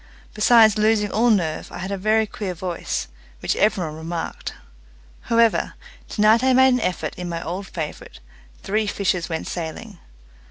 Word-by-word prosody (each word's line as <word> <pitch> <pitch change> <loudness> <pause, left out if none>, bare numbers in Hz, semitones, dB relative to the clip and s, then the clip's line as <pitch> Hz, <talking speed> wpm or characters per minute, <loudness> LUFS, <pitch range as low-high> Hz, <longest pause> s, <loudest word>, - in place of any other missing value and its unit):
Besides 220 -1 +5
losing 215 -1 +2
all 235 +3 +3
nerve, 175 -8 0
I - - -7
had 190 +2 -5
a - - 0
very 215 +3 +2
queer 205 -4 -5
voice, 175 0 -3 0.3
which - - -1
every 205 -4 +2
one 155 - -6
remarked. 165 +1 -5 0.7
However, 230 -1 +3 0.3
tonight 215 +3 +4
I 260 0 +4
made 260 0 +6
an 250 - +1
effort 180 - -2
in 180 -1 -4
my 170 -1 -4
old 185 +4 -5
favourite, 155 - -7 0.4
"Three 215 +2 0
Fishers 185 -4 -1
Went 160 -1 -3
Sailing". 175 +4 -6
200 Hz, 160 wpm, -22 LUFS, 175-220 Hz, 0.7 s, made